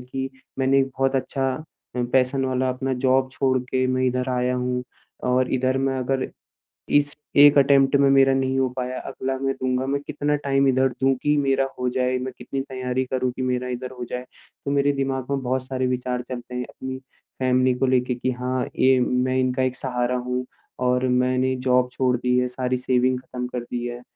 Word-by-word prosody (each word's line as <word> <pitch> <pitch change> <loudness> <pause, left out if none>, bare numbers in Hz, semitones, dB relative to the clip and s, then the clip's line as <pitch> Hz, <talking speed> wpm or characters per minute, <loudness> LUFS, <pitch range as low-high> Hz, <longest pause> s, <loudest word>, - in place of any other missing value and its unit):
कि 130 +1 -4 0.3
मैंने 135 +1 +3
एक 135 - +2
बहुत 135 0 +2
अच्छा 135 +1 -1 0.5
अ, 125 - +1
पैशन 130 +1 +2
वाला 130 0 0
अपना 130 +1 -2
जॉब 130 0 +3
छोड़ 130 -2 +1
के 130 +1 -1
मैं 130 0 0
इधर 125 +1 0
आया 125 0 0
हूँ। 125 0 -1 0.4
और 125 0 +1
इधर 130 +1 +1
मैं 135 -1 0
अगर, 130 +1 -1 0.6
इस 145 0 +2 0.3
1 145 0 +7
अटेम्प्ट 135 0 +5
में 140 -1 +5
मेरा 135 0 +5
नहीं 135 0 0
हो 130 - +2
पाया, 125 0 -4
अगला 130 0 -4
मैं 135 0 0
दूँगा, 130 0 -1
मैं 140 +1 0
कितना 150 0 0
टाइम 140 -1 +1
इधर 130 0 +3
दूँ 135 0 +4
कि 150 0 +3
मेरा 135 -1 +2
हो 125 - 0
जाए। 125 0 0
मैं 130 0 -5
कितनी 135 -1 -4
तैयारी 130 -1 -2
करूँ 130 -1 0
कि - - -4
मेरा 125 0 -1
इधर 125 +1 -4
हो - - -3
जाए। 125 0 -4 0.4
तो 140 - -1
मेरे 140 0 +3
दिमाग़ 135 -1 -1
में 135 -1 0
बहुत 130 +1 -1
सारे 130 -1 -1
विचार 125 0 -2
चलते 125 0 -6
हैं 125 0 -2
अपनी 130 0 -6 0.4
फ़ैमिली 130 0 +3
को 135 - +3
लेके। 125 -1 +2
कि 130 +1 -1
हाँ, 125 +1 -2
ये 130 0 +5
मैं 125 +1 +1
इनका 130 0 +1
एक 130 -1 0
सहारा 125 -1 -1
हूँ 125 0 -1 0.3
और 125 0 +1
मैंने 130 +1 +2
जॉब 125 0 +2
छोड़ 130 -1 +1
दी 125 +1 +1
है, 125 0 +2
सारी 125 0 -2
सेविंग 125 0 +1
ख़त्म 125 -1 -6
कर 125 -1 -4
दी 120 0 -2
है। 120 0 -6
130 Hz, 205 wpm, -23 LUFS, 125-135 Hz, 0.6 s, 1